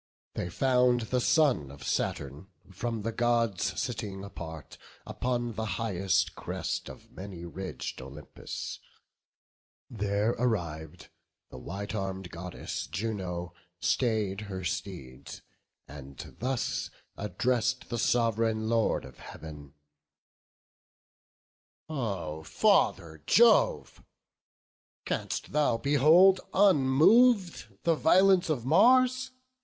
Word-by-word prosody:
They 90 - -4
found 125 +3 +2
the 125 +3 -1
son 135 - +2
of 70 +1 -12
Saturn, 70 +5 -3 0.2
from 115 +3 -4
the 115 - -2
Gods 115 -6 0
Sitting 105 -6 -4
apart, 80 -5 -9 0.3
upon 120 -1 -2
the 110 +1 -3
highest 95 -5 0
crest - - -4
Of - - -13
many 95 -3 -9
ridg'd 90 -2 -6
Olympus; 70 +2 -8 1.1
there 105 0 0
arriv'd, 85 -10 -3 0.4
The 65 - -9
white 100 - -6
arm'd 95 -3 -4
Goddess 90 +1 -6
Juno 90 -2 -4 0.3
stay'd 110 -5 0
her 95 -1 -5
steeds, 80 -7 -6 0.4
And 70 -2 -11
thus 130 +1 -2 0.3
address'd 120 +6 -1
the 120 - -2
Sov'reign 115 -1 +1
Lord 115 -8 +1
of 65 -1 -14
Heav'n: 75 -2 -11 2.1
"O 95 - -3
Father 80 0 +1
Jove! 230 -2 +4 1.0
canst - - -3
thou 145 -5 +2
behold 155 +9 +5
unmov'd 190 - +4
The 170 - +3
violence 185 +3 +4
of 130 -7 -1
Mars? 255 - +4
110 Hz, 95 wpm, -29 LUFS, 90-130 Hz, 2.1 s, behold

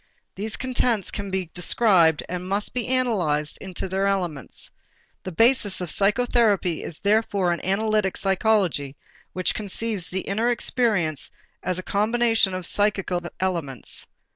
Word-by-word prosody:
These 210 +3 -4
contents 245 -5 0
can 200 -1 -5
be 185 -3 -3
described 180 -4 +3
and 180 +1 -5
must 200 +2 -1
be 245 -3 -1
analyzed 190 -13 0
into 190 -1 -5
their 190 +1 0
elements. 175 - -3 0.5
The 185 - -5
basis 225 +1 +3
of 180 -3 -3
psychotherapy 210 -4 +2
is 160 - -7
therefore 200 -3 +2
an 170 - -6
analytic 210 0 0
psychology 190 -8 +1 0.4
which 185 -1 0
conceives 210 -2 -2
the 190 +1 -2
inner 220 +6 0
experience 215 - +1 0.3
as 185 -1 -2
a 185 - -5
combination 225 -1 +2
of 185 -1 -4
psychical 195 -2 +1 0.2
elements. 165 -9 -2
195 Hz, 135 wpm, -24 LUFS, 180-220 Hz, 0.5 s, described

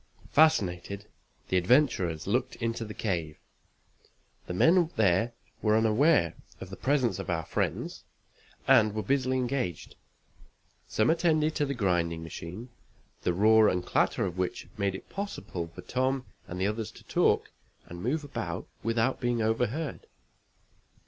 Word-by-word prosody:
Fascinated, 100 - +2 0.4
the 95 - +2
adventurers 90 - +2
looked 125 +5 0
into 115 0 -2
the 105 -1 -7
cave. 85 -7 -2 1.1
The - - -4
men 165 - +4
there 110 +3 +2 0.3
were 110 0 +3
unaware 110 - +3 0.3
of 95 - -9
the - - -5
presence 130 -4 +1
of 95 - -5
our 80 -2 -1
friends, - - -2 0.6
and 110 -1 +5
were 110 - -2
busily 130 -1 +1
engaged. 125 - -2 0.9
Some 110 +7 +2
attended 160 -2 +2
to 145 -2 0
the 140 - -2
grinding 85 -6 0
machine, 90 +8 -8 0.5
the - - +1
roar 110 +2 +6
and 90 -1 -1
clatter - - +1
of 90 -1 -4
which 90 - -2
made 100 -1 -1
it - - -9
possible 195 - -5
for 80 - -11
Tom 130 +1 -1 0.2
and 90 - -6
the 95 - +1
others 105 +1 -2
to - - -15
talk - - +1 0.3
and 85 0 -9
move 150 - -1
about 145 - -5
without 115 +3 0
being 120 -2 +1
overheard. 125 +7 -1
110 Hz, 140 wpm, -29 LUFS, 90-130 Hz, 1.1 s, roar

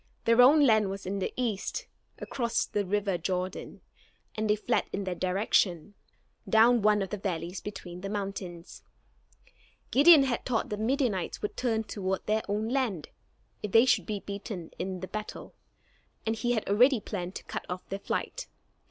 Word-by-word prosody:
Their 230 +1 +6
own 285 +4 +7
land 215 -5 +4
was 195 0 -6
in 195 +2 -2
the 190 - -2
east, 245 - -2 0.3
across 235 -2 -1
the 205 - -1
river 195 -1 -1
Jordan, 185 +2 -4 0.5
and 215 0 -2
they 210 - +5
fled 215 - 0
in 200 - -3
that 185 -2 -4
direction, 185 -1 +1 0.6
down 230 +2 +5
one 210 -1 +3
of 190 - -7
the 210 - -3
valleys 180 -1 -3
between 180 -4 -8
the 195 - -4
mountains. 195 -4 -5 1.1
Gideon 295 +1 +8
had 260 -3 -1
thought 240 -3 -1
that 210 - -3
the 215 - -3
Midianites 240 -7 -1
would 210 - -3
turn 225 -3 0
toward 190 -3 -3
their 215 +1 +1
own 210 +2 -1
land, 235 - -1 0.5
if 210 - -5
they 230 +2 +7
should 260 - +2
be 210 -3 -3
beaten 200 -4 -6
in 185 0 -4
the 185 - -5
battle, 215 +1 -7 0.7
and 225 0 0
he 240 +2 0
had 220 - -2
already 245 +5 +5
planned 185 -3 -5
to - - -6
cut - - -6
off 180 0 -5
their 195 - -4
flight. - - -3
210 Hz, 175 wpm, -29 LUFS, 190-230 Hz, 1.1 s, Gideon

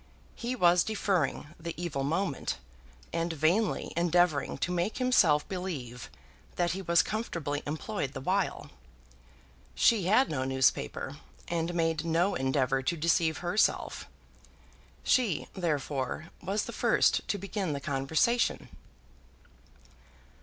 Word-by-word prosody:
He 240 +2 -3
was 175 -5 +5
deferring 185 -8 -1
the 170 0 -6
evil 155 -6 -2
moment, 165 - -1 0.6
and 170 0 -1
vainly 165 +8 +1
endeavouring 170 -4 +2
to 175 - -1
make 180 +4 -1
himself 195 - +3
believe 140 -11 -5 0.5
that 175 -1 +1
he 190 - -3
was 170 -2 +3
comfortably 170 -9 -3
employed 150 - -3
the - - -5
while. - - -1 1.0
She 215 -6 +4
had 220 +8 +4
no 130 -4 -2
newspaper, 130 +1 0 0.3
and 170 0 -2
made 165 -2 +1
no 170 +4 +2
endeavour 130 0 +1
to 170 +6 -1
deceive 160 0 +2
herself. 190 +5 +1 1.0
She, 235 - +2
therefore, 150 -3 -2
was 200 +3 -1
the - - -7
first - - +2
to 205 - 0
begin 195 -3 -3
the 140 - -3
conversation. 150 - +1
170 Hz, 120 wpm, -30 LUFS, 145-190 Hz, 1.0 s, was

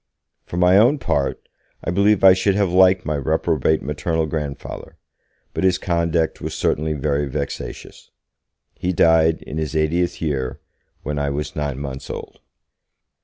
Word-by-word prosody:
For 85 - -5
my 90 +2 +5
own 125 +7 +4
part, 70 - -2 0.4
I - - -2
believe 100 +2 +3
I 95 -1 +9
should 95 +1 +1
have 100 -3 +1
liked 95 0 +4
my 75 0 -1
reprobate 80 +1 0
maternal 80 +3 -1
grandfather, 75 -2 -6 0.6
but - - -2
his 95 -1 +3
conduct 85 -2 0
was - - -4
certainly 80 +1 0
very 70 0 -1
vexatious. 70 0 -6 0.6
He 90 +1 -2
died, 80 -1 +3
in 80 - -5
his 80 0 -3
eightieth 85 +3 0
year, 70 -3 -2 0.4
when 75 +1 -3
I 70 0 0
was 75 +2 -4
nine 75 -3 -2
months 70 -1 -6
old. - - -7
80 Hz, 150 wpm, -21 LUFS, 75-90 Hz, 0.6 s, I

